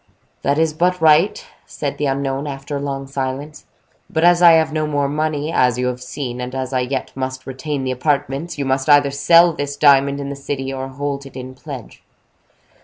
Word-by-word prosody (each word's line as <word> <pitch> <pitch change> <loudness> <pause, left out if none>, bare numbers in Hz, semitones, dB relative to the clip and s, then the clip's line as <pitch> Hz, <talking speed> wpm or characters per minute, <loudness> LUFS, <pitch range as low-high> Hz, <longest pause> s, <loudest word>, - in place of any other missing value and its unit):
"That 140 +1 +1
is 160 -1 +2
but 180 +3 +1
right," 165 - +4 0.2
said - - -5
the 145 - 0
unknown, 135 +1 -2
after 140 +1 -5
a - - -5
long 135 -1 -4
silence; 135 +2 -5 0.4
"but 160 - -1
as 175 0 +5
I 170 -1 +8
have 160 -1 +3
no 155 -1 0
more 145 -2 0
money, 150 +1 -2
as 125 -4 +3
you 125 - -1
have 125 0 -3
seen, 125 -1 -5
and 125 +1 -5
as 130 0 -3
I 130 - +2
yet 130 +1 -3
must 130 0 -4
retain 135 +1 -4
the 130 - -1
apartments, 140 +4 -1
you 140 - -2
must 135 +2 0
either 145 -1 +5
sell 165 +5 +5
this 145 -1 -4
diamond 140 -1 +4
in 140 0 -4
the 140 - -5
city, 135 -1 -4
or 135 0 -4
hold 140 +1 -4
it 135 - -16
in 130 0 -7
pledge." 130 -3 -10
140 Hz, 205 wpm, -19 LUFS, 130-150 Hz, 0.4 s, I